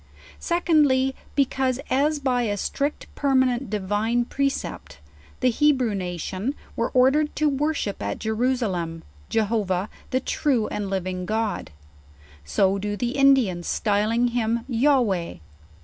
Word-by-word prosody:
SecoddJy, 295 Hz, -7 st, +2 dB, 0.2 s
because, 265 Hz, -2 st, +1 dB
as 295 Hz, +4 st, +2 dB
by 260 Hz, -3 st, 0 dB
a 205 Hz, -4 st, -1 dB
strict 285 Hz, +8 st, -2 dB
permanent 260 Hz, -3 st, +1 dB
divine 210 Hz, +4 st, 0 dB
precept, 275 Hz, -, -3 dB, 0.4 s
the 255 Hz, -, +4 dB
Hebrew 260 Hz, -4 st, +2 dB
nation 185 Hz, -, -3 dB, 0.2 s
were 230 Hz, -, 0 dB
ordered 275 Hz, +4 st, +3 dB
to 305 Hz, -, +2 dB
worship 285 Hz, -, -1 dB
at 100 Hz, 0 st, -2 dB
Jeru 235 Hz, +4 st, 0 dB
salem, 175 Hz, -9 st, -3 dB, 0.3 s
Jehovah, 210 Hz, -3 st, 0 dB, 0.2 s
the 255 Hz, -, +1 dB
true 260 Hz, -4 st, 0 dB
and 205 Hz, -2 st, -3 dB
living 185 Hz, -1 st, -3 dB
God, 220 Hz, -2 st, -2 dB, 0.7 s
so 195 Hz, -, +1 dB
do 205 Hz, +1 st, -3 dB
tho 245 Hz, -, -1 dB
Indians, 255 Hz, -10 st, +3 dB
styling 220 Hz, +4 st, +1 dB
him 235 Hz, -1 st, -1 dB
Yohewah. 235 Hz, -, +1 dB
235 Hz, 120 wpm, -24 LUFS, 205-270 Hz, 0.7 s, the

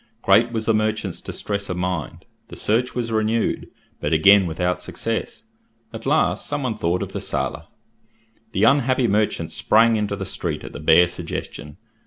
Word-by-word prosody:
Great 120 Hz, +1 st, +4 dB
was 110 Hz, -2 st, -2 dB
the 115 Hz, -, +3 dB
merchant's 110 Hz, -3 st, -1 dB
distress 100 Hz, -1 st, -4 dB
of 90 Hz, -, -3 dB
mind. 90 Hz, -3 st, -3 dB, 0.2 s
The -, -, -10 dB
search 120 Hz, +4 st, 0 dB
was 120 Hz, -2 st, -2 dB
renewed, 110 Hz, +1 st, 0 dB, 0.3 s
but 75 Hz, +2 st, -1 dB
again 95 Hz, +4 st, +6 dB
without 90 Hz, +2 st, -1 dB
success. 115 Hz, -, -4 dB, 0.5 s
At 115 Hz, +3 st, -7 dB
last 155 Hz, +3 st, +1 dB
some 145 Hz, -1 st, -2 dB
one 120 Hz, -4 st, -1 dB
thought 85 Hz, +2 st, -1 dB
of -, -, -7 dB
the -, -, -4 dB
sailor. -, -, -3 dB, 0.9 s
The 100 Hz, -, 0 dB
unhappy 130 Hz, 0 st, +3 dB
merchant 105 Hz, 0 st, 0 dB
sprang 115 Hz, +1 st, +3 dB
into 105 Hz, -1 st, -1 dB
the -, -, -5 dB
street -, -, -4 dB
at -, -, -9 dB
the -, -, -7 dB
bare 80 Hz, +3 st, +5 dB
suggestion. 85 Hz, -3 st, -7 dB
110 Hz, 170 wpm, -22 LUFS, 90-115 Hz, 0.9 s, again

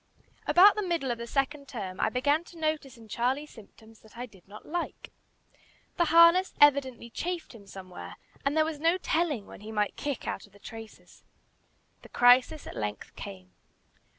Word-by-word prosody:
About 395 Hz, +4 st, +8 dB
the 425 Hz, -, -2 dB
middle 335 Hz, -9 st, -1 dB
of 235 Hz, -, -4 dB
the 235 Hz, -, -6 dB
second 280 Hz, +2 st, -1 dB
term 190 Hz, -7 st, -6 dB
I -, -, +2 dB
began 285 Hz, +5 st, +1 dB
to 345 Hz, -, -14 dB
notice 310 Hz, -5 st, -2 dB
in 225 Hz, -1 st, -14 dB
Charlie 255 Hz, +6 st, -1 dB
symptoms 220 Hz, -3 st, -16 dB
that 220 Hz, +1 st, -18 dB
I 245 Hz, -, -4 dB
did 195 Hz, -7 st, -20 dB
not 210 Hz, +2 st, -12 dB
like. 345 Hz, +2 st, -5 dB, 0.9 s
The 345 Hz, -, +3 dB
harness 335 Hz, +3 st, +6 dB
evidently 265 Hz, -5 st, +3 dB
chafed 350 Hz, +1 st, -4 dB
him 205 Hz, -4 st, -14 dB
somewhere, 185 Hz, -2 st, -9 dB, 0.3 s
and 280 Hz, +3 st, 0 dB
there 310 Hz, -, +4 dB
was 315 Hz, -2 st, -4 dB
no 330 Hz, +4 st, +3 dB
telling 315 Hz, -, -1 dB
when -, -, -12 dB
he 215 Hz, +1 st, -8 dB
might 210 Hz, -2 st, -1 dB
kick 285 Hz, -4 st, -4 dB
out -, -, -4 dB
of 200 Hz, -, -27 dB
the 205 Hz, -, -18 dB
traces. 225 Hz, 0 st, -12 dB, 0.8 s
The -, -, -15 dB
crisis 250 Hz, +5 st, +4 dB
at -, -, -8 dB
length 105 Hz, -1 st, -5 dB
came. 90 Hz, -1 st, -9 dB
260 Hz, 180 wpm, -29 LUFS, 220-315 Hz, 0.9 s, About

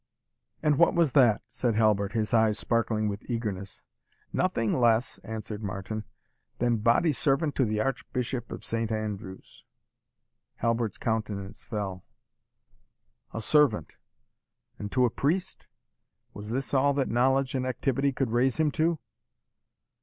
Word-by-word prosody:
"And 150 Hz, -1 st, +3 dB
what 170 Hz, -, +5 dB
was 170 Hz, -5 st, +3 dB
that?" 120 Hz, -6 st, +4 dB
said 120 Hz, -1 st, -1 dB
Halbert, 105 Hz, -2 st, +2 dB
his 110 Hz, -1 st, -1 dB
eyes 110 Hz, -2 st, +4 dB
sparkling 110 Hz, -2 st, 0 dB
with 100 Hz, 0 st, -3 dB
eagerness. 105 Hz, -5 st, -4 dB, 0.5 s
"Nothing 115 Hz, -, +1 dB
less," 120 Hz, -1 st, +2 dB
answered 110 Hz, -1 st, -6 dB
Martin, 100 Hz, +2 st, -4 dB, 0.5 s
"than 120 Hz, -1 st, +1 dB
body 120 Hz, +9 st, +3 dB
servant 145 Hz, +2 st, +1 dB
to 130 Hz, -, +2 dB
the 110 Hz, -1 st, 0 dB
Archbishop 125 Hz, -1 st, -3 dB
of -, -, -7 dB
Saint 115 Hz, 0 st, -1 dB
Andrews!" 105 Hz, -3 st, -5 dB, 0.9 s
Halbert's 115 Hz, -2 st, -1 dB
countenance 105 Hz, -2 st, -3 dB
fell. 100 Hz, -5 st, -4 dB, 1.3 s
"A 115 Hz, -, -4 dB
servant 125 Hz, -, +3 dB, 0.8 s
and 105 Hz, 0 st, -5 dB
to 125 Hz, -1 st, +3 dB
a 120 Hz, -, +1 dB
priest? 175 Hz, +10 st, -1 dB, 0.7 s
Was 105 Hz, +1 st, -8 dB
this 130 Hz, +5 st, -2 dB
all 140 Hz, +1 st, +3 dB
that 135 Hz, -2 st, +1 dB
knowledge 130 Hz, +2 st, +2 dB
and 130 Hz, -1 st, -1 dB
activity 135 Hz, +2 st, 0 dB
could 130 Hz, -3 st, -2 dB
raise 125 Hz, +2 st, +2 dB
him 155 Hz, -2 st, +2 dB
to?" 160 Hz, +3 st, +1 dB
115 Hz, 130 wpm, -28 LUFS, 110-135 Hz, 1.3 s, what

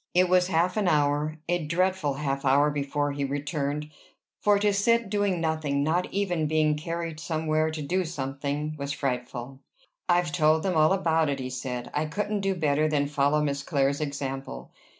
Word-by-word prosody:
It 180 Hz, 0 st, +4 dB
was 180 Hz, 0 st, +4 dB
half 180 Hz, +2 st, +1 dB
an 205 Hz, -3 st, +1 dB
hour, 150 Hz, 0 st, +1 dB
a 175 Hz, -1 st, 0 dB
dreadful 170 Hz, -2 st, 0 dB
half 140 Hz, -1 st, -2 dB
hour, 140 Hz, +2 st, +4 dB
before 145 Hz, 0 st, -1 dB
he 140 Hz, 0 st, -3 dB
returned; 145 Hz, +1 st, -3 dB, 0.5 s
for 205 Hz, -1 st, +4 dB
to 205 Hz, 0 st, +2 dB
sit 230 Hz, +1 st, +2 dB
doing 205 Hz, -4 st, +1 dB
nothing, 155 Hz, -3 st, 0 dB
not 170 Hz, +4 st, 0 dB
even 180 Hz, -6 st, 0 dB
being 155 Hz, 0 st, +2 dB
carried 165 Hz, 0 st, -4 dB
somewhere 155 Hz, 0 st, 0 dB
to 155 Hz, -1 st, -5 dB
do 185 Hz, +6 st, 0 dB
something, 145 Hz, -1 st, -3 dB
was 140 Hz, 0 st, -3 dB
frightful. 125 Hz, -1 st, -4 dB, 0.5 s
"I've 175 Hz, -3 st, +3 dB
told 155 Hz, +2 st, +3 dB
them 185 Hz, -3 st, 0 dB
all 155 Hz, +1 st, +5 dB
about 165 Hz, -5 st, +2 dB
it," 140 Hz, -1 st, -2 dB
he 130 Hz, 0 st, -4 dB
said. 125 Hz, -1 st, -5 dB
"I 150 Hz, +1 st, 0 dB
couldn't 205 Hz, +6 st, -2 dB
do 195 Hz, -1 st, 0 dB
better 155 Hz, -2 st, +1 dB
than 145 Hz, -2 st, +1 dB
follow 145 Hz, +1 st, +1 dB
Miss 140 Hz, -1 st, -1 dB
Clare's 140 Hz, -1 st, 0 dB
example. 135 Hz, -, -5 dB
155 Hz, 175 wpm, -27 LUFS, 140-175 Hz, 0.5 s, all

